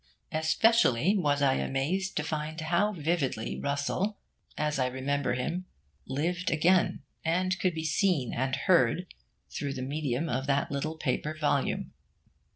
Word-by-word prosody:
Especially 160 - +3
was 145 -7 +1
I 135 -1 +4
amazed 180 +9 -1
to 150 - +1
find 155 +1 -3
how 170 +6 +1
vividly 150 - -1
Russell, 145 +9 -1 0.4
as 150 -2 0
I 130 - +2
remember 130 +1 -1
him, 170 +9 -2 0.4
lived 170 +7 -1
again, 175 +3 +3 0.2
and 185 +3 +1
could 180 -3 +1
be 160 0 -3
seen 155 - +1
and 130 +1 0
heard, 175 -1 +2 0.4
through 140 -2 -3
the 130 -1 -4
medium 140 +1 -1
of 130 -1 -2
that 140 -1 +1
little 155 +3 -2
paper 150 +2 -1
volume. 145 -3 0
150 Hz, 140 wpm, -29 LUFS, 135-175 Hz, 0.4 s, I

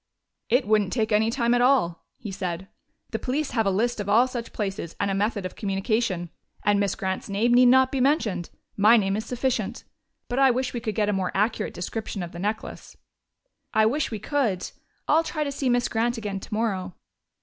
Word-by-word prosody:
"It 245 +2 +3
wouldn't 210 -3 +2
take 225 -2 0
any 215 +1 +3
time 235 0 +1
at 245 - +3
all," 245 -10 +2
he 215 - -7
said. 185 -1 -4 0.4
"The - - -2
police 280 +3 -2
have 225 -4 +1
a - - +4
list 225 +5 0
of 205 -1 -3
all 225 +5 +5
such 240 -2 -6
places 195 -5 -4
and 200 -1 0
a - - 0
method 205 0 -1
of 185 - -6
communication. 195 -3 -1 0.3
And 205 0 +3
Miss 200 -2 0
Grant's 190 0 -3
name 220 +5 +2
need 250 +1 +7
not 260 +1 +5
be 270 - 0
mentioned 225 - +1 0.3
my 215 +4 +6
name 195 -2 +1
is 220 +2 -3
sufficient. 250 +1 -2 0.4
But 245 +2 -1
I 270 -1 +6
wish 255 +1 0
we 240 - -2
could 215 -2 -4
get 210 -2 +1
a - - +1
more 190 -2 -1
accurate 210 +4 0
description 200 +1 -4
of 170 - -7
the 170 - -8
necklace." 210 +4 -4 0.8
"I 220 0 +5
wish 275 +7 +1
we 220 - -4
could. 220 -4 -1 0.4
I'll 320 +2 +4
try 310 -1 -2
to 285 - -3
see 275 -1 -1
Miss 245 0 +2
Grant 235 +2 0
again 205 -3 -4
tomorrow." 195 -4 -2
220 Hz, 205 wpm, -25 LUFS, 195-245 Hz, 0.8 s, need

